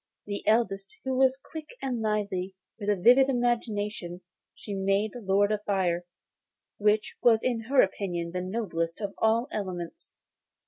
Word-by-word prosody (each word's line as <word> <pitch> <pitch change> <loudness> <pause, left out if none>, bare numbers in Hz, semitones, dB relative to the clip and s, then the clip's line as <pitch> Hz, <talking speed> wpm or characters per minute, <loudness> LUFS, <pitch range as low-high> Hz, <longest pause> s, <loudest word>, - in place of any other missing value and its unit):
The 205 -1 -4
eldest, 205 -3 +1
who 265 0 -1
was 265 0 +4
quick 310 - -10
and 250 -4 -2
lively, 200 -3 -1 0.2
with 205 -1 -3
a 205 - +4
vivid 250 +8 +6
imagination, 215 -7 -1 0.3
she 205 - -7
made 195 +2 +1
Lord 205 -3 +1
of 210 -1 -1
Fire, 180 -3 0 0.7
which 210 +1 +2
was 225 -2 +5
in 245 -2 +1
her 265 +2 +5
opinion 175 -3 -2
the 180 +1 -2
noblest 180 -4 -2
of 200 -2 -4
all 225 +2 +3
the 280 - -5
elements. 180 -4 -6
210 Hz, 150 wpm, -28 LUFS, 190-235 Hz, 0.7 s, vivid